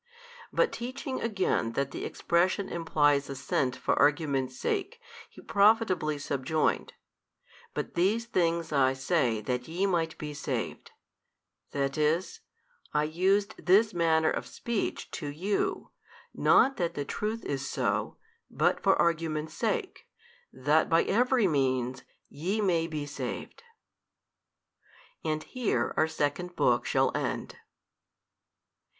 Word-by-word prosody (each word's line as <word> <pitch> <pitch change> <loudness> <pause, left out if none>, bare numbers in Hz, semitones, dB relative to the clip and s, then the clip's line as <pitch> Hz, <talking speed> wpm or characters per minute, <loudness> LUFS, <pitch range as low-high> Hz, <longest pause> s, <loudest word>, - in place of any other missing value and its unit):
But - - +2
teaching 255 +2 -5
again 190 - 0
that 140 +1 -1
the - - -5
expression 185 +3 +1
implies 145 -4 +2
assent 130 -1 -1
for - - 0
argument's 140 -3 +2
sake, 420 +2 -2 0.3
He - - -14
profitably 200 -7 +3
subjoined, 145 +2 -1 0.8
But - - -3
these 205 +7 +1
things 170 -7 0
I 135 -2 +3
say 130 -5 0
that 125 +3 -3
YE 175 +5 -1
might 165 -4 0
be 150 -1 -6
saved, 145 - -4 0.8
that 140 +1 -2
is, 160 +5 +1 0.6
I 150 - +3
used 190 +7 +1
this 205 +4 +4
manner 160 -2 +3
of - - -3
speech 235 -3 -3
to 150 - -5
you, 180 +8 -2 0.4
not 270 - +4
that 170 -2 -1
the 145 - -3
truth 215 +8 -3
is 135 -1 -3
so, - - -1 0.3
but - - +1
for - - +4
argument's 160 -2 0
sake, - - -2 0.4
that 145 +5 +2
by 165 0 +4
every 245 0 +3
means 130 -4 0 0.3
YE 185 +9 -2
may 170 -5 +2
be 155 -3 -4
saved. 145 - -6 1.6
And 155 -1 -1
here 250 -4 -1
our 155 - +3
second 160 +3 -2
book - - +2
shall - - +2
end. - - -3
160 Hz, 120 wpm, -29 LUFS, 145-195 Hz, 1.6 s, this